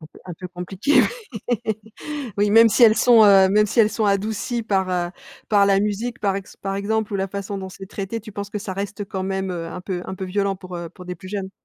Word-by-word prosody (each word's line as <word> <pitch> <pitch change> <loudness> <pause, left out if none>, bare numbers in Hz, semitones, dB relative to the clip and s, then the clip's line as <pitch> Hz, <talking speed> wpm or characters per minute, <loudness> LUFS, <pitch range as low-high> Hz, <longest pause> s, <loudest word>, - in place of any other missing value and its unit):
Donc 155 0 -13
un 180 - -7
peut 180 +2 -8
compliqué. 185 - +1 0.5
Oui, 245 - +2 0.8
oui, 205 0 +2
même 225 +2 +7
si 240 - +2
elles 220 -1 +8
sont, 230 -1 +6
heu, 195 -2 +7
même 210 +2 +4
si 230 +3 +2
elle 215 - +4
sont 220 - -1
adoucies 210 +4 0
par, 195 -4 0
heu, 175 -1 -1 0.4
par 200 -2 +4
la 195 -1 +4
musique 210 +4 -2
par 195 -2 +1
ex 195 -1 -8
par 195 0 -4
exemple 210 +2 -1
ou - - 0
la 195 0 -1
façon 200 +1 -5
dont 190 -1 -6
c'est 190 +1 -10
traité, 200 +3 -5
tu 215 0 -11
penses 200 0 -6
que 210 - -3
ça 200 -2 -5
reste 205 +2 -4
quand 190 -1 -4
même, 190 0 -2
heu, 170 -2 -4
un 175 +2 -7
peu 180 -1 -4
un - - -5
peu 190 - -5
violent 195 +1 -1
pour, 185 -1 -8
heu, 170 -1 -6
pour 180 - -13
des 180 0 -5
plus 185 +2 -12
jeunes? 195 -1 -4
195 Hz, 260 wpm, -22 LUFS, 190-210 Hz, 0.8 s, elles